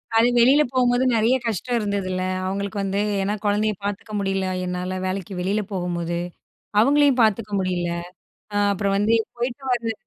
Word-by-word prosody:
அது 225 +1 +5
வெளில 265 +5 +6
போகும்போது 250 0 +3
நெறைய 230 +3 +3
கஷ்டம் 235 +3 -1
இருந்தது 200 -3 -2
இல்ல? 185 0 -2 0.2
அவுங்களுக்கு 200 +2 -3
வந்து, 195 +1 -1 0.2
ஏன்னா 200 +2 0
குழந்தைய 210 +1 +2
பாத்துக்க 205 +2 -4
முடியல 195 -1 -1 0.2
என்னால, 180 +1 -3
வேலைக்கு 185 0 -3
வெளில 195 +4 0
போகும்போது. 175 -2 -2 0.6
அவுங்களையும் 280 +2 +4
பாத்துக்க 215 -1 +2
முடியல. 180 -2 -1 0.6
அ, 205 - -3 0.2
அப்புறம் 200 0 0
வந்து, 210 +3 +3 0.2
போயிட்டு 245 +3 -3
வரது 230 -2 0
205 Hz, 150 wpm, -23 LUFS, 185-230 Hz, 0.6 s, வெளில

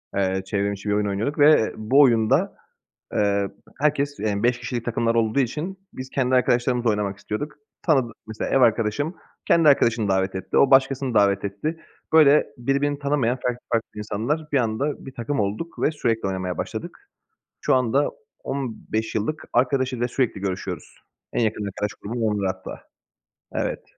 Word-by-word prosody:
Eee, 95 -1 +1
çevrim 100 +1 -1
içi 100 +1 -6
bir - - +2
oyun 105 0 +1
oynuyorduk 110 +10 -2
ve 145 -6 +5
bu 115 +6 +2
oyunda, 135 - +3 0.6
eee, 100 -1 +1 0.3
herkes, 145 -1 +1
eee 105 -1 -1
5 120 +1 +2
kişilik 120 -1 -4
takımlar 115 0 0
olduğu 115 +3 +2
için 155 +9 -2
biz 130 0 -8
kendi 130 -1 +1
arkadaşlarımızla 125 -1 +2
oynamak 100 -2 -2
istiyorduk. 125 +10 -4 0.3
Tanıdı 130 -8 +2
mesela 110 0 -4
ev 135 - +3
arkadaşım 115 - +2 0.3
kendi 165 -2 +5
arkadaşını 115 -6 +3
davet 95 0 +1
etti. 95 - -4
O, 135 - +5
başkasını 135 -1 +3
davet 100 -1 +3
etti. 125 +12 -3 0.3
Böyle 150 -2 +6
birbirini 140 +3 0
tanımayan 140 -4 0
farklı 125 0 -1
farklı 115 0 +1
insanlar 115 +10 -2
bir 140 - +4
anda 125 +6 -2
bir 135 - -8
takım 120 +3 -2
olduk 105 +12 -3
ve - - +4
sürekli 115 -8 -1
oynamaya 95 -1 -3
başladık. - - -5 0.6
Şu - - +3
anda 130 +3 +2 0.3
15 115 -4 -3
yıllık 110 +9 -2
arkadaşıyla 125 -1 +1
sürekli 120 -5 -1
görüşüyoruz. 95 -2 -4 0.4
En - - +1
yakın 105 -1 -1
arkadaş 100 +1 -3
grubum 115 +3 -3
onlar 105 -3 0
hatta. 95 -1 -10 0.7
Evet. - - -2
120 Hz, 160 wpm, -23 LUFS, 105-140 Hz, 0.7 s, Böyle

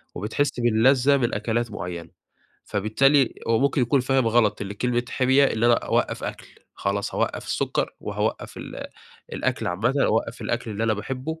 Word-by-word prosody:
وبتحس 125 +8 -1
باللذة 125 +4 +4
من 120 -2 0
أكلات 120 0 -1
معيّنة. 85 -3 -6 0.6
فبالتالي 130 +6 +2
هو 115 -1 +3
ممكن 140 0 +2
يكون 130 +3 +2
فاهم 130 -1 +1
غلط، 115 -2 +2
اللي 100 0 -5
كلمة 120 +2 0
حِمية، 130 +3 +3
اللي 115 -3 +1
أنا 120 - +6
أوقّف - - -1
أكل، - - -6 0.3
خلاص 100 +1 -2
هاوقّف - - -1
السكر، - - -1
وهاوقّف - - -3
ال - - -7 0.5
الأكل - - -1
عامةً، 105 +10 0
أوقّف 115 +2 0
الأكل 120 -1 -2
اللي 110 +2 -2
أنا 110 - +2
باحبّه، 130 +9 -5
120 Hz, 160 wpm, -24 LUFS, 110-130 Hz, 0.6 s, أنا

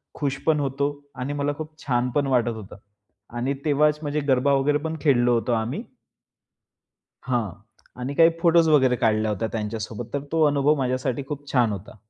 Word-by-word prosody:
खुश 140 -2 -2
पण 155 -2 +3
होतो 140 0 0 0.3
आणि 130 +2 -4
मला 145 0 -1
खूप 155 0 -8
छान 125 -2 0
पण 145 -2 +2
वाटत 125 -3 +2
होतं 105 -4 -10 0.6
आणि 130 +3 0
तेव्हाच 150 0 +3
म्हणजे 150 0 -2
गरबा 135 +1 +3
वगैरे 140 +2 +2
पण 160 0 -2
खेळलो 125 -5 +3
होतो 120 +1 0
आम्ही. 115 +2 -2 1.4
हां. 120 -6 0 0.5
आणि 130 +3 -3
काही 165 +2 +7
फोटोज 170 -1 +5
वगैरे 130 -5 +4
काढल्या 110 -2 +1
होत्या 105 +2 -2
त्यांच्यासोबत. 110 +1 -4
तर 140 - 0
तो 165 -1 +3
अनुभव 145 +1 +3
माझ्यासाठी 130 -1 -1
खूप 145 -1 -7
छान 120 -4 +3
होता. 100 +1 -7
135 Hz, 170 wpm, -24 LUFS, 120-145 Hz, 1.4 s, काही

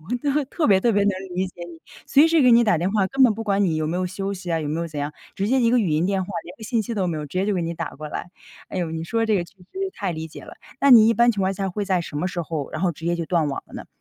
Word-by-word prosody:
我 245 - 0 0.2
都 300 - +1
特 310 +3 -1
别 195 -3 +5
特 235 +3 +2
别 205 -1 +2
能 200 - +3 0.2
理 190 +1 0
解 - - -19
你， 165 -1 -12 0.3
随 300 +4 +5
时 325 -1 +4
给 250 -2 +6
你 235 +1 +7
打 190 -8 +2
电 180 +3 0
话， 210 -3 +2
根 270 +4 +2
本 225 -4 +4
不 225 - -5
管 200 -2 +1
你 165 -4 +1
有 155 0 -1
没 165 +3 -2
有 185 0 -1
休 195 +2 -4
息 185 -2 -6
啊、 165 - 0
有 150 - -3
没 155 +2 -2
有 170 - -2
怎 155 -3 -7
样。 145 +1 -3 0.2
直 200 +1 -1
接 260 +2 +3
一 230 -1 +3
个 245 - +4
语 190 -8 +1
音 155 +4 +1
电 195 -1 0
话， - - -10
连 175 - -10
个 220 - -14
信 230 +1 0
息 225 +2 -4
都 190 -4 0
没 165 - -2
有， 150 -1 -5
直 145 - -9
接 185 - +2
就 210 - 0
给 185 - 0
你 165 0 -3
打 165 -2 -4
过 150 +2 -8
来。 175 - -6 0.4
哎 185 - -4
哟， 170 -2 -2
你 160 0 -4
说 230 +7 -2
的 225 - +1
这 220 - +2
个 180 - 0
确 180 - -21
实 180 - -19 0.3
太 190 -3 -3
理 160 0 -6
解 - - -11
了， - - -11 0.3
那 280 - +5
你 225 -2 +8
一 230 - +3
般 235 +1 +4
情 205 - -3
况 190 0 +1
下 195 0 -3
会 200 +3 -3
在 190 -2 +1
什 160 -3 -7
么 175 +5 -1
时 180 -2 -4
候， 155 -4 -4
然 155 - -5
后 180 -2 +1
直 160 - -12
接 170 +1 0
就 170 - -3
断 165 -3 +1
网 140 - -3
了 - - -16
呢？ - - -8
190 Hz, 390 characters per minute, -23 LUFS, 165-220 Hz, 0.4 s, 你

